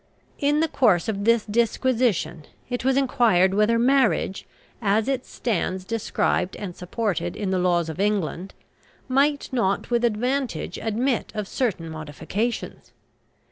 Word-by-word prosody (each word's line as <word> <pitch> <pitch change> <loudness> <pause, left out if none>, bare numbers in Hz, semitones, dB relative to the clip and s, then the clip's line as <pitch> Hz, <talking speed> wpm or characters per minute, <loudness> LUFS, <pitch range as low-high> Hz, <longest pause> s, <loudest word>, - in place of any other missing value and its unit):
In 295 +2 +2
the 325 - +2
course 210 - +2
of 200 -2 -2
this 230 -1 +3
disquisition 220 - 0 0.3
it 245 - -2
was 265 +1 +2
enquired 235 -9 +3
whether 210 +3 +3
marriage, 245 -5 +2 0.3
as 210 +1 +2
it 265 -2 -1
stands 185 -4 -2
described 215 -4 -1
and 185 -4 -6
supported 180 -2 -2
in 200 -3 -2
the 185 - +1
laws 175 -2 +2
of 160 +2 -6
England, 195 -3 -1 0.5
might 285 +2 +1
not 200 -2 0
with 240 0 +2
advantage 240 - -1
admit 235 +3 -1
of 210 -2 -3
certain 200 -11 -2
modifications. 160 +9 -4
215 Hz, 135 wpm, -24 LUFS, 185-245 Hz, 0.5 s, this